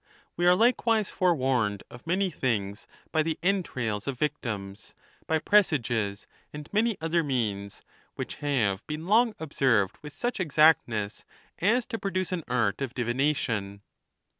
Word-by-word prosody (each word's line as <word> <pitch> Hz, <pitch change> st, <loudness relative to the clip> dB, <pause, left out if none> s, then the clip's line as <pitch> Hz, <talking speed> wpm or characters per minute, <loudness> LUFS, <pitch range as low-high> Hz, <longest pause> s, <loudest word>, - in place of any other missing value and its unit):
We 175 Hz, +1 st, +1 dB
are 180 Hz, -, +7 dB
like 235 Hz, +4 st, +2 dB
wise 220 Hz, -3 st, +2 dB
forewarned 130 Hz, -, +1 dB
of 120 Hz, +6 st, -13 dB
many 185 Hz, +2 st, +1 dB
things 105 Hz, -8 st, -2 dB, 0.2 s
by 160 Hz, -, +2 dB
the 160 Hz, 0 st, -1 dB
entrails 130 Hz, -, -1 dB
of 135 Hz, -2 st, -2 dB
victihis, 115 Hz, -9 st, -4 dB, 0.3 s
by 160 Hz, -, +2 dB
presages, 120 Hz, -, +1 dB, 0.3 s
and 150 Hz, 0 st, -8 dB
many 220 Hz, 0 st, +2 dB
other 165 Hz, +1 st, +1 dB
means, 105 Hz, -8 st, -2 dB, 0.3 s
which -, -, -5 dB
have 115 Hz, -9 st, 0 dB
been 155 Hz, +2 st, -5 dB
long 220 Hz, +3 st, +3 dB
observed 130 Hz, -10 st, +1 dB
with 150 Hz, -1 st, -9 dB
such 245 Hz, -2 st, -2 dB
exactness 145 Hz, -, +2 dB, 0.4 s
as 230 Hz, +6 st, +2 dB
to 225 Hz, -, -5 dB
produce 185 Hz, -2 st, -2 dB
an 180 Hz, -3 st, -2 dB
art 115 Hz, -2 st, 0 dB
of 135 Hz, -2 st, -3 dB
divi 120 Hz, -2 st, -1 dB
nation. 115 Hz, -8 st, -1 dB
145 Hz, 145 wpm, -27 LUFS, 115-180 Hz, 0.4 s, are